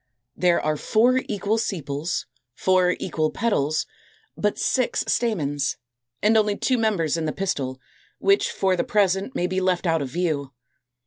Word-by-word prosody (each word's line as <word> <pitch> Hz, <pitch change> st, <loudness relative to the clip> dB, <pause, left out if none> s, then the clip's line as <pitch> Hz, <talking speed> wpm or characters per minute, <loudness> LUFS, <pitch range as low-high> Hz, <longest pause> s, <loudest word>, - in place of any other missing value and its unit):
There 175 Hz, -1 st, +3 dB
are 155 Hz, 0 st, -1 dB
four 245 Hz, -, +3 dB
equal 210 Hz, +2 st, 0 dB
sepals, 160 Hz, -6 st, -3 dB, 0.3 s
four 185 Hz, -1 st, +3 dB
equal 155 Hz, -3 st, -1 dB
petals; 155 Hz, -10 st, 0 dB, 0.5 s
but 210 Hz, 0 st, 0 dB
six 255 Hz, -2 st, +1 dB
stamens, 150 Hz, -, 0 dB, 0.5 s
and 215 Hz, +2 st, +4 dB
only 210 Hz, -2 st, +3 dB
two 255 Hz, -2 st, +1 dB
members 190 Hz, -8 st, +1 dB
in 165 Hz, -, -2 dB
the 155 Hz, -, 0 dB
pistil, 135 Hz, -9 st, -3 dB, 0.4 s
which 395 Hz, 0 st, +3 dB
for 190 Hz, -1 st, +1 dB
the 175 Hz, -, 0 dB
present 200 Hz, +4 st, +1 dB
may 175 Hz, -, 0 dB
be 185 Hz, +1 st, -1 dB
left 185 Hz, -1 st, +1 dB
out 165 Hz, -2 st, +2 dB
of 135 Hz, -, -3 dB
view. 145 Hz, -3 st, -2 dB
185 Hz, 150 wpm, -24 LUFS, 155-210 Hz, 0.5 s, and